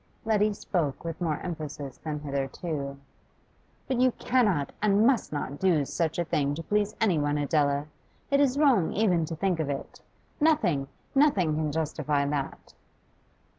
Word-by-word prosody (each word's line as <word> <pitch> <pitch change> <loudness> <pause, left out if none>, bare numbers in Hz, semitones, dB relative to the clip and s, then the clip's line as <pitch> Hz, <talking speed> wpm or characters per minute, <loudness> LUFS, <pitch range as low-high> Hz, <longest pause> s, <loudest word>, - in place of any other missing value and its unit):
Letty 215 -1 +3
spoke 165 -8 -2
with 165 +1 -5
more 160 -4 0
emphasis 145 -5 -6
than 150 -2 -4
hitherto. 140 0 -3 0.9
'But 260 -2 0
you 255 -1 +4
cannot 205 - +1
and 210 +1 +4
must 255 -2 +2
not 145 -1 -4
do 170 -7 +3
such 160 +2 -1
a 175 - 0
thing 145 -2 0
to 165 - -6
please 210 +2 0
any 195 -8 +3
one, 145 0 0
Adela! 145 -1 +1 0.5
It 280 - +4
is 280 -2 +3
wrong 260 - +3
even 185 -6 +2
to 165 - -5
think 180 0 0
of 155 -3 -1
it. 140 -1 -5 0.4
Nothing, 200 - +2 0.3
nothing 240 - +3
can 155 -1 -1
justify 150 -2 0
that. 140 -1 -4
160 Hz, 155 wpm, -28 LUFS, 145-210 Hz, 0.9 s, you